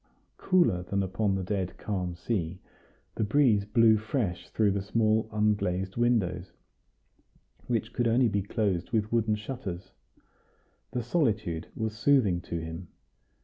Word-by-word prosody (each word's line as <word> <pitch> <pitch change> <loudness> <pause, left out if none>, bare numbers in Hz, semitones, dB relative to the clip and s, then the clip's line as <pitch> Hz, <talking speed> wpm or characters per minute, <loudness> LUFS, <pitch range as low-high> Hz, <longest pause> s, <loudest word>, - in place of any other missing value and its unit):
Cooler 175 - +2
than 100 +2 -1
upon 95 +1 0
the 95 - -2
dead 95 -1 -3
calm 90 -4 -3
sea, 90 -2 -3 0.5
the - - -1
breeze 110 -3 +3
blew 110 +1 +5
fresh 105 -5 -3
through 105 -2 +2
the 100 0 -1
small 110 +2 +1
unglazed 100 -3 0
windows, 100 -7 0 1.1
which 115 -1 -1
could 120 -1 +1
only 120 +2 +4
be 100 -2 0
closed 100 -3 -1
with 110 -2 0
wooden 115 -2 +2
shutters. 100 -5 -6 1.0
The 125 - -3
solitude 110 - 0
was 110 -1 -3
soothing 110 -8 +3
to 85 - -5
him. 80 +2 -6
105 Hz, 135 wpm, -28 LUFS, 95-115 Hz, 1.1 s, blew